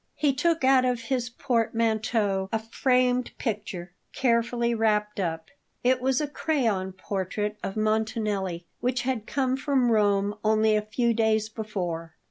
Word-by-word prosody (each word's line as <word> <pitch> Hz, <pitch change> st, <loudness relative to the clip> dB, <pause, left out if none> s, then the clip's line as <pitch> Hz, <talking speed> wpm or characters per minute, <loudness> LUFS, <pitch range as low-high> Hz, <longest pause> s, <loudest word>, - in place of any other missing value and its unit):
He 290 Hz, -2 st, +2 dB
took 325 Hz, +2 st, +1 dB
out 260 Hz, -1 st, +5 dB
of 250 Hz, -1 st, +1 dB
his 240 Hz, 0 st, -2 dB
portmanteau 225 Hz, -5 st, 0 dB
a 225 Hz, -, +2 dB
framed 250 Hz, +2 st, +1 dB
picture, 200 Hz, -6 st, -4 dB, 0.2 s
carefully 235 Hz, -1 st, +1 dB
wrapped 210 Hz, -2 st, +1 dB
up. 165 Hz, -3 st, -3 dB, 0.3 s
It 255 Hz, 0 st, +3 dB
was 260 Hz, 0 st, +2 dB
a 300 Hz, -, -1 dB
crayon 235 Hz, -11 st, 0 dB
portrait 205 Hz, +2 st, -3 dB
of 195 Hz, -, -4 dB
Montanelli, 215 Hz, -5 st, -1 dB
which 250 Hz, 0 st, 0 dB
had 245 Hz, -4 st, -2 dB
come 260 Hz, -2 st, 0 dB
from 265 Hz, -3 st, +1 dB
Rome 205 Hz, -2 st, +2 dB
only 215 Hz, 0 st, +3 dB
a 210 Hz, -, +2 dB
few 230 Hz, +3 st, 0 dB
days 220 Hz, -1 st, +1 dB
before. 180 Hz, -7 st, -4 dB
225 Hz, 140 wpm, -26 LUFS, 210-250 Hz, 0.3 s, out